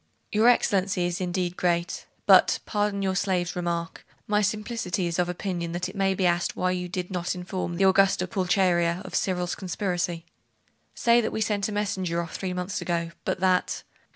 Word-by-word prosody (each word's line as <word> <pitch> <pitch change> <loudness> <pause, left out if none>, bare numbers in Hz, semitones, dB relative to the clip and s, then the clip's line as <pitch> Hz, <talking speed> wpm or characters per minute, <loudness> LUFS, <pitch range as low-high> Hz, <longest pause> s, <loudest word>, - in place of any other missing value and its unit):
'Your 220 +2 +4
Excellency 190 -6 +3
is 175 +1 -2
indeed 180 -1 -1
great.... 175 -1 -1 0.2
but - - +6
pardon 205 -2 -1
your 190 -1 0
slave's 180 -2 0
remark 170 -1 -3 0.2
my 210 0 +2
simplicity 210 -3 -1
is 170 0 -2
of 175 0 +1
opinion 175 -2 -3
that 175 +1 -2
it 190 - -10
may 195 -1 +1
be 190 - 0
asked 175 0 +1
why 185 0 0
you 180 -1 -3
did 180 +1 -4
not 180 0 -2
inform 180 -1 -4
the 190 +2 +4
Augusta 190 -1 +4
Pulcheria 180 -1 +1
of - - -9
Cyril's 180 -2 0
conspiracy?' 175 -2 -2 0.7
'Say 235 0 +4
that 220 - -2
we - - -3
sent 205 -1 0
a - - -4
messenger 190 -4 -1
off 170 -1 -5
three 190 -2 -3
months 180 +1 -3
ago, 170 -1 -1
but - - -1
that.... 185 -1 +1
185 Hz, 180 wpm, -26 LUFS, 175-195 Hz, 0.7 s, but